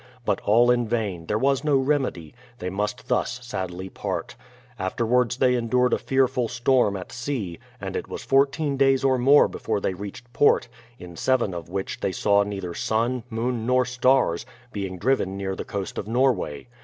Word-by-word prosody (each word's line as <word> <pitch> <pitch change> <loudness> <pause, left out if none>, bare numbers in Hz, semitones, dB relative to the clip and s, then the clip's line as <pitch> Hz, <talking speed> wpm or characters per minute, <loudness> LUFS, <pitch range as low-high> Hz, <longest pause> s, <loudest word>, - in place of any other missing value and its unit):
But - - +1
all 120 +4 +4
in 120 -1 +1
vain, 100 -8 -2
there 105 - +1
was 135 +3 +1
no 150 -2 +3
remedy; 135 - -1 0.2
they 90 -3 -4
must 105 +2 -3
thus 125 - 0
sadly 95 -6 -5
part. - - -4 0.4
Afterwards 120 +5 +1
they 130 -1 +3
endured 125 +1 +2
a - - +2
fearful 130 -2 +1
storm 120 -3 +2
at 90 - -8
sea, 120 -9 -4 0.2
and - - -5
it - - -3
was - - -7
fourteen 140 +1 +2
days 135 -1 +3
or 130 -2 +3
more 140 +4 +6
before 110 -2 -2
they 95 - -1
reached 105 +6 -9
port, 145 - +4 0.3
in 90 -1 -11
seven 120 0 +1
of 85 -2 -7
which 95 +1 -4
they 95 - -1
saw 100 +2 +3
neither 100 -4 -4
sun, 115 +6 0
moon, 115 0 -2
nor 125 0 +3
stars, 125 -7 +2 0.3
being 95 -2 -4
driven 95 -3 0
near 95 -1 -3
the - - -6
coast 100 -2 -4
of 100 - -6
Norway. 120 - 0
120 Hz, 180 wpm, -24 LUFS, 95-130 Hz, 0.4 s, more